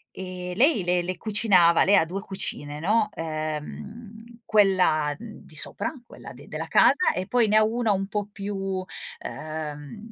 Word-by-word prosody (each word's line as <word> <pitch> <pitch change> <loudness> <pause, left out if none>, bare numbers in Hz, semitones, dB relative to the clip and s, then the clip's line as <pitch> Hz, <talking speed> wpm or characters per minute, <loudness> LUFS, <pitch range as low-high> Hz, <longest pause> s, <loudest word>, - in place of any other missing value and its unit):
Ehm, 180 -1 -6
lei 260 - +3
le 175 0 +2
le 185 +1 -3
cucinava 195 -6 +4
lei 200 +1 +5
ha - - +5
2 185 +4 -4
cucine, 150 -7 -5
no, 210 +5 +2
ehm, 200 +9 -6
quella 185 -8 +3
di 215 -7 -11
sopra, 315 - -2
quella - - -11
d - - -14
della - - -5
casa 455 - +4
e 185 0 -3
poi 245 -2 +3
ne 210 - +3
ha 215 - +5
1 225 0 +1
un 195 0 -1
po' 205 0 -2
più, 195 -2 -3 0.4
ehm, 155 +2 -6
195 Hz, 160 wpm, -25 LUFS, 165-215 Hz, 0.4 s, lei